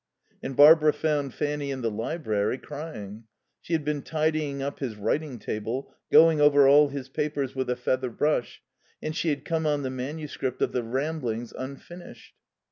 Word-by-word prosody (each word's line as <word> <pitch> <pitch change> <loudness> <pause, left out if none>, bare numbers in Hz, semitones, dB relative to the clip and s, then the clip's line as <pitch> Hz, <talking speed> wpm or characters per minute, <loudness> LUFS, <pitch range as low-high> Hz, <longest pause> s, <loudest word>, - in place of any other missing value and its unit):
And 135 - -5
Barbara 150 +1 +7
found 145 -4 -1
Fanny 145 -1 -2
in 130 -2 -4
the 115 - 0
library, 110 -2 -1
crying. 115 -9 -8 0.4
She 170 - -5
had 155 -3 0
been 150 -1 -1
tidying 155 -2 -1
up 140 +1 -4
his 125 -6 -4
writing 135 +6 -2
table, 115 +5 -4 0.2
going 160 -2 +6
over 145 -1 +6
all 145 +2 +7
his 135 -2 -6
papers 145 -1 -2
with 130 -1 -2
a 125 - +1
feather 130 +1 -1
brush, 135 +1 -1 0.4
and 155 0 -4
she 165 - 0
had 145 -2 -2
come 160 -1 -1
on 145 -1 0
the 130 - -2
manuscript 135 0 -4
of - - 0
the 125 - -1
Ramblings 120 -2 -3
unfinished. 140 +7 -10
140 Hz, 170 wpm, -26 LUFS, 125-150 Hz, 0.4 s, Barbara